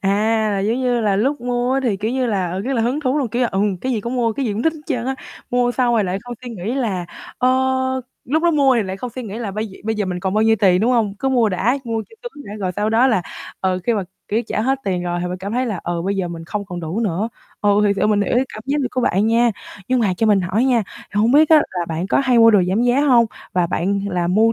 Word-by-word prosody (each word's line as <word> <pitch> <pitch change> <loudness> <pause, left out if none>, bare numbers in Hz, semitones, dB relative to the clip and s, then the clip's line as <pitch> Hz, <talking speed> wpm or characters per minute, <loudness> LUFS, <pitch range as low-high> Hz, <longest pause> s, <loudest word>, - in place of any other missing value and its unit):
À, 215 +2 +1
là 200 - 0
giống 220 +5 0
như 245 -2 +1
là 205 -3 +1
lúc 275 +8 0
mua 245 +1 -1
á 270 - +1
thì, 230 -6 0
kiểu 215 +3 -2
như, 260 0 0
là, 195 -6 -1
ờ, 185 +2 -3
rất 255 +7 -2
là 235 -4 +1
hứng 250 +6 0
thú 275 0 0
luôn, 270 -5 -1
kiểu 240 +4 -1
là, 240 - +2
ừm, 195 0 +1
cái 255 +8 -3
gì 225 - -1
cũng 235 +4 -4
mua 235 -2 +1
cái 265 +3 -2
gì 215 - -1
cũng 210 +3 -3
thích 320 - +2
hết 310 - -11
trơn 250 -6 -2
á, 265 - -1 0.4
mua 245 0 +2
xong 245 -2 +1
rồi 215 -3 +2
lại 185 +1 -2
không 245 0 -7
suy 245 - -7
nghĩ 220 +2 -4
là, 205 -10 -2 0.3
ơ, 250 - +3 0.8
lúc 310 +6 0
đó 345 - +4
mua 280 -4 +4
thì 230 - +2
lại 190 -1 -5
không 245 +5 -6
suy 255 +3 -7
nghĩ 215 -1 -6
là 225 -4 -4
bây 215 +3 -3
giờ 190 - -13
bây 220 +1 0
giờ 210 -1 -1
mình 180 -1 -3
còn 190 +1 -2
bao 215 - +3
nhiêu 225 0 +4
tiền, 185 -2 +4
đúng 230 +4 +2
hông? 220 -5 +1
Cứ 270 - 0
mua 245 -4 +3
đã, 210 +8 0
mua 225 -2 -2
cho - - -15
sướng 385 -13 -9
đã 205 - -7
rồi 185 -3 -2
sau 210 +1 0
đó 230 +4 +4
là, 220 -8 +2 0.4
ờ, 185 -1 0
khi 235 - +2
mà, 205 - -1 0.3
kiểu, 220 +3 0
trả - - -2
hết 265 +4 +1
tiền 185 -2 -1
rồi 175 0 -2
thì 180 - -2
bạn 180 +1 -5
cảm 195 +3 -5
thấy 250 +2 0
là, 205 -7 -3
ờ, 170 -1 -2
bây 195 +2 -1
giờ 185 -2 -1
mình 165 -1 -7
không 205 +4 -4
còn 180 -3 -6
đủ 170 +6 -3
nữa. 205 0 -1 0.3
Ừ, 205 - +1 0.2
thiệt 200 0 +1
sự - - +2
mình 210 -1 +2
hiểu 205 - 0
cái 250 +2 +3
cảm 215 - -8
giác 280 +2 0
của 255 - -1
bạn 205 -3 +2
nha, 235 +1 +3 0.4
nhưng 255 -1 +2
mà 200 -5 +1
cho 225 - +1
mình 205 -2 +4
hỏi 185 +7 0
nha 245 -4 +3
thì 205 - -7
hông 225 +3 +3
biết 305 +2 +6
á 320 - +9
là 180 -2 -2
bạn 165 +2 -2
có - - +2
hay 250 -2 +4
mua 230 0 +8
đồ 205 -4 +5
giảm 200 +6 +1
giá 245 +3 +3
hông 250 -5 +5 0.3
và 180 -1 +2
bạn 195 +4 -1
là 180 -3 -1
mua, 215 +6 +3
220 Hz, 310 wpm, -20 LUFS, 195-245 Hz, 0.8 s, á